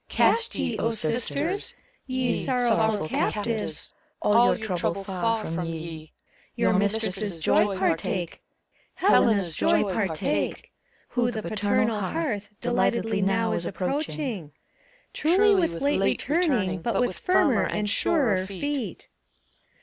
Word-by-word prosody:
Cast 465 -1 +2
ye, - - -2
sisters! 250 - -1 0.3
ye 255 -2 -1
Sorrowful 220 -7 +1
captives, 215 +6 -2 0.3
All 235 +3 +4
your 220 -5 -3
trouble 170 +3 -1
far 215 +3 -1
from 165 +2 -3
ye! 160 -1 -7 0.4
Your - - +2
mistress's 205 -2 0
joy 205 +1 +3
partake, 175 -1 -1 0.5
Helena's 205 - +3
joy - - +3
partake. 180 -6 -1 0.4
Who 245 0 +1
the 220 -3 -4
paternal 215 +1 0
hearth 210 - -2
Delightedly 235 -3 +1
now 220 +4 +1
is 170 - -2
approaching. 215 - -3 0.6
Truly 385 +7 +4 0.2
with 275 - -6
late 280 -8 +1
returning 255 - +1
But 215 +1 -1
with 245 -7 -1
firmer 285 - +3
and 210 0 -2
surer 205 - +1
feet! 230 - -4
215 Hz, 110 wpm, -26 LUFS, 190-245 Hz, 0.6 s, All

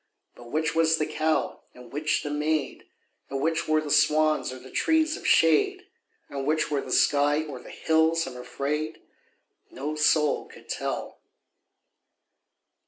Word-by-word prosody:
But 120 0 -14
which 155 +3 0
was 165 0 +3
the 155 - 0
cow 155 +1 -1
and 125 0 -14
which 150 +1 0
the 145 - -4
maid, 150 -1 -2 0.4
And 135 - -3
which 160 +3 0
were 155 0 +3
the 150 -1 -5
swans 155 -2 +3
or 130 - -7
the 130 +1 -13
trees 320 -1 +2
of - - -6
shade, 160 -2 +3 0.4
And 140 -1 -5
which 155 0 +1
were 145 -2 0
the 130 - -8
sky 145 +3 +3
or 145 -5 -8
the - - -13
hills, 160 +1 +2
I'm 130 -1 -8
afraid, 145 +5 -3 0.7
No 145 +4 -5
soul 150 -1 +2
could - - -16
tell. - - -4
150 Hz, 155 wpm, -26 LUFS, 140-160 Hz, 0.7 s, was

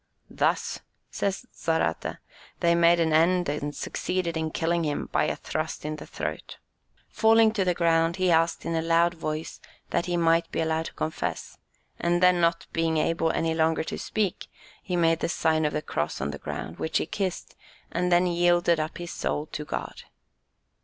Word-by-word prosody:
"Thus," - - 0 0.3
says 200 +4 -2
Zarate, 160 - -1 0.4
"they 170 0 +3
made 170 0 +5
an 160 -2 +2
end, 175 +3 +3
and 145 0 -3
succeeded 180 +1 -2
in 160 0 -1
killing 170 +2 0
him 150 -2 -2
by - - +2
a - - -1
thrust 155 -1 -4
in 155 0 -3
the - - -10
throat. - - -5 0.5
Falling 225 0 +4
to 210 -3 0
the 180 -1 +1
ground, 165 0 +2
he 185 -1 +2
asked 165 0 +2
in 165 - -1
a 165 - +1
loud 170 +1 +3
voice 155 -1 -5 0.3
that 175 - 0
he 175 -1 0
might 165 0 +2
be - - -2
allowed 160 0 0
to - - -10
confess, 160 +1 -4 0.4
and 175 0 +1
then 180 -1 +5
not 170 0 +2
being 165 -1 +1
able 165 +1 +1
any 165 0 0
longer 160 0 +1
to - - -5
speak, 210 -5 -2 0.3
he 180 - -3
made 165 -1 +3
the - - -1
sign 160 -2 +1
of 150 - 0
the 150 - -2
cross 75 0 -2
on 70 +2 -2
the 70 - -7
ground, 80 - -6
which 160 - 0
he - - 0
kissed, 195 -4 -4 0.4
and 180 +1 0
then 175 +1 +5
yielded 175 -1 +3
up 155 0 -3
his 175 -1 -6
soul 150 - -2
to 150 - -4
God." - - -5
165 Hz, 185 wpm, -26 LUFS, 160-175 Hz, 0.5 s, made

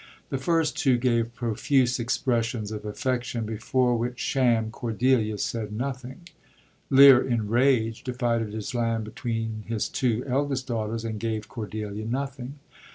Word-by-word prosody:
The 135 - -2
first 160 +2 +1
two 130 -3 +3
gave 120 -1 0
profuse 125 +2 +1
expressions 115 -3 -1
of 105 -1 -6
affection, 120 +1 -2
before 120 +3 +1
which 120 +2 -3
sham 115 -4 +1
Cordelia 115 -2 +1
said 105 +1 -3
nothing. 130 +7 -5 0.6
Lear, 135 -1 +9
in 115 -4 -1
rage, 115 -1 +2
divided 120 -4 -1
his 110 +3 -5
land 115 -2 0
between 110 0 -4
his 110 -2 -1
two 120 -2 0
eldest 135 0 -1
daughters, 115 -2 -3
and 110 -2 -4
gave 110 -1 -3
Cordelia 105 -1 -5
nothing. 135 +2 -4
120 Hz, 135 wpm, -26 LUFS, 110-130 Hz, 0.6 s, Lear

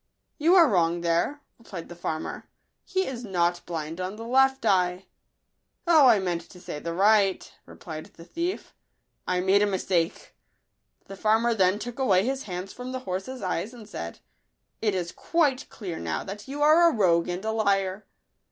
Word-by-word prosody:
" - - -51
You 335 +5 +5
are 340 -4 +8
wrong 175 -6 +2
there," 170 - 0 0.2
replied 190 -7 -8
the 175 - -10
farmer; 160 -2 -5 0.2
" - - -52
he 380 0 +2
is 250 -2 -5
not 175 -4 0
blind 165 0 -4
on 185 +2 -4
the 225 +1 -8
left 265 +1 +3
eye." 180 -2 +2 0.4
" - - -51
O, 315 -5 +7
I 225 - +6
meant 175 -3 -1
to 180 - -14
say 150 -4 -6
the 170 +2 -4
right," 200 0 +3 0.2
replied 155 -2 -9
the 165 - -15
thief; 340 - -4 0.3
" - - -50
I 180 0 +1
made 190 +2 +4
a 210 - +3
mistake." 180 -3 -1 0.7
The 195 - -9
farmer 220 +4 +2
then 190 -2 +3
took 235 +4 -7
away 195 -7 +3
his 265 +1 -1
hands 180 +2 -5
from 250 +1 -7
the 255 - -4
horse's 195 +4 -5
eyes, 185 +5 -2
and 220 -3 -12
said, 85 - -6 0.3
" - - -50
It 210 -3 +1
is 175 -2 -2
quite 285 - 0
clear, 185 -7 -6
now, 80 -1 -3
that 205 +4 -8
you 285 +2 -2
are 330 +3 +6
a - - -2
rogue 175 -5 +3
and 180 +4 -4
a 220 - 0
liar. 200 -2 0
195 Hz, 195 wpm, -26 LUFS, 175-245 Hz, 0.7 s, are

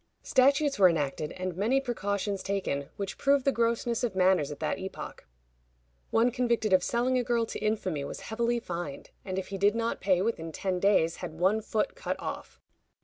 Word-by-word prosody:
Statutes 275 0 +3
were 185 -2 +8
enacted, 150 -2 -1
and 185 -1 -4
many 225 +9 +2
precautions 205 -6 -2
taken, 190 -8 -2
which 200 -1 -5
prove 280 -1 +3
the 275 - +3
grossness 235 -1 0
of 225 -6 -1
manners 185 -5 +3
at 145 - -7
that - - -1
epoch. 190 0 -7 0.8
One 235 +2 +3
convicted 235 -4 +1
of 185 - +6
selling 250 +2 +1
a - - 0
girl 235 -2 +1
to - - -6
infamy 195 -8 -1
was - - -6
heavily 235 +2 -1
fined, 170 -9 -6
and 185 -1 -4
if 190 - -3
he 195 -1 -5
did 205 +2 +4
not 230 0 -1
pay 185 -2 +2
within 165 -7 -2
ten 185 +2 -2
days 180 -4 +3
had 170 -3 -6
one 190 +6 +2
foot 220 +3 -1
cut - - -3
off. - - -6
200 Hz, 190 wpm, -29 LUFS, 185-235 Hz, 0.8 s, were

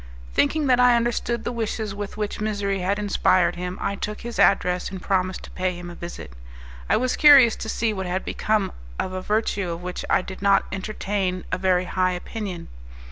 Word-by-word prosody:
Thinking 300 - +2
that 250 -2 +4
I 250 -1 +6
understood 235 0 -1
the - - -2
wishes 220 -3 -3
with 205 0 -6
which 210 0 -3
misery 205 -2 -1
had 190 +3 0
inspired 185 -3 +2
him, 180 +1 -5
I 200 - -1
took 210 +1 -5
his 235 0 -6
address, 180 -2 +3
and 190 - -7
promised 185 0 -1
to - - -11
pay 185 -1 -2
him 175 0 -8
a - - -8
visit. 170 - -8 0.6
I - - +4
was 255 +2 0
curious 275 -7 +7
to 220 - -5
see 225 -1 0
what 190 -2 -4
had 185 +1 -2
become 215 -2 0 0.3
of 185 - -3
a 185 - -3
virtue 210 -2 -1
of 170 +1 -5
which 180 0 -5
I - - +3
did 190 0 -9
not 200 0 +4
entertain 190 -1 -2
a - - -1
very 185 -1 +2
high 185 0 0
opinion. 185 -1 -6
195 Hz, 200 wpm, -24 LUFS, 185-220 Hz, 0.6 s, curious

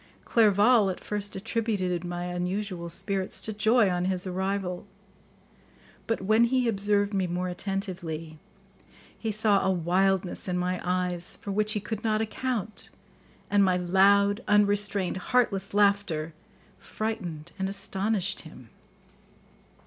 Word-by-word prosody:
Clerval 215 0 +4
at 185 - -4
first 205 -1 -4
attributed 195 -4 -1
my 175 0 -4
unusual 180 0 -3
spirits 190 +2 -3
to 220 - -3
joy 220 +1 +4
on 180 -1 0
his 185 0 -1
arrival, 190 0 -2 1.2
but 225 - -1
when 215 +4 +4
he 250 0 +1
observed 205 -1 +1
me 190 -2 +1
more 180 +1 -2
attentively, 175 -5 -5 0.8
he 225 - -3
saw 210 -1 +2
a - - +2
wildness 185 +2 +1
in 180 -1 -1
my 180 0 -1
eyes 180 -1 -2
for 200 - -6
which 215 +2 0
he 210 - -1
could 215 +1 -5
not 215 -1 +1
account, 220 -1 -3 0.6
and 205 -1 +3
my 185 -2 +3
loud, 200 +4 +4
unrestrained, 205 -2 +2
heartless 195 -2 +1
laughter 200 -6 +1 0.5
frightened 175 -8 -5
and 190 0 -1
astonished 195 0 -1
him. 130 -8 -13
195 Hz, 125 wpm, -27 LUFS, 180-210 Hz, 1.2 s, Clerval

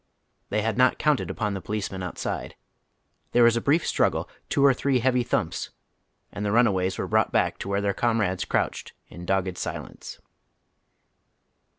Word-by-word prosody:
Tiiey 105 - +1
had 115 +1 -1
not 130 0 +4
counted 140 - +1
upon 105 +1 -2
the 95 - -4
policemen 100 -2 -4
outside. 90 -2 -4 0.8
There 120 - +5
was 115 0 +5
a 115 - 0
brief 150 +6 +2
struggle, - - +1 0.2
two 140 - +3
or 135 - +6
three 135 +1 +1
heavy 125 +1 +2
thumps, 120 - -2 0.6
and 105 - -5
tlie 100 - 0
runaways 95 -6 +2
were - - -2
brought - - +1
hack - - +1
to - - -5
where 100 0 0
their 100 -1 0
comrades 110 -5 0
crouched - - -2 0.2
in 85 0 -10
dogged 95 -2 0
silence. - - -6
105 Hz, 165 wpm, -25 LUFS, 95-125 Hz, 0.8 s, or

